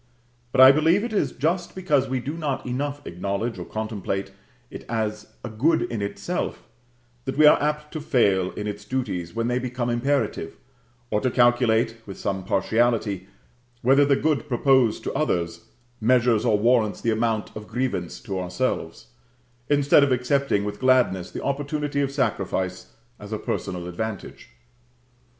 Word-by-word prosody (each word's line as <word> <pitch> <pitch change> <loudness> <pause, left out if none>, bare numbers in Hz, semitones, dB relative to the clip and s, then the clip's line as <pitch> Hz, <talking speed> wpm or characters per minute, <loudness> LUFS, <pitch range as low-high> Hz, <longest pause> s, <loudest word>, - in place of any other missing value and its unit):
But 130 - +4
I 130 +1 +11
believe 160 +7 +3
it 235 -1 -4
is 145 -10 +1
just 170 +6 -1
because 150 -8 +1
we 130 0 0
do 140 +4 -4
not 150 -5 -3
enough 145 +3 -3
acknowledge 100 +6 -3
or - - -6
contemplate 105 -3 -4 0.4
it - - -8
as 110 -2 -2 0.2
a - - -5
good 150 +10 +2
in 115 -3 -4
itself, 100 - -3 0.6
that 135 +1 -4
we 155 - +6
are 150 - +7
apt 150 0 -2
to 155 - -4
fail 100 -10 +2
in 105 - -5
its 105 -1 -5
duties 105 -9 -3
when 115 0 0
they 125 +1 0
become 125 -1 -2
imperative, 120 - -1 0.6
and 105 - +1
to 130 - +1
calculate, 120 -2 +3
with 95 - -8
some 95 -2 -3
partiality, 105 0 0 0.6
whether 135 +4 +5
the 140 -1 +3
good 150 +1 0
proposed 130 -3 +2
to - - -3
others 85 - -1 0.4
measures 120 -1 +3
or 110 -3 +3
warrants 110 -1 +2
the 115 - 0
amount 110 -1 -1
of 105 0 -8
grievance 115 -8 -3
to 95 -1 -4
ourselves, 90 0 -3 0.6
instead 145 0 +5
of 140 - +2
accepting 125 -3 +1
with 105 0 -5
gladness 125 -8 +2
the - - -7
opportunity 145 +1 -2
of 140 - 0
sacrifice 95 -9 -2 0.3
as 105 0 -10
a 110 - -1
personal 90 -4 -4
advantage. 100 +3 -6
120 Hz, 160 wpm, -24 LUFS, 105-140 Hz, 0.6 s, I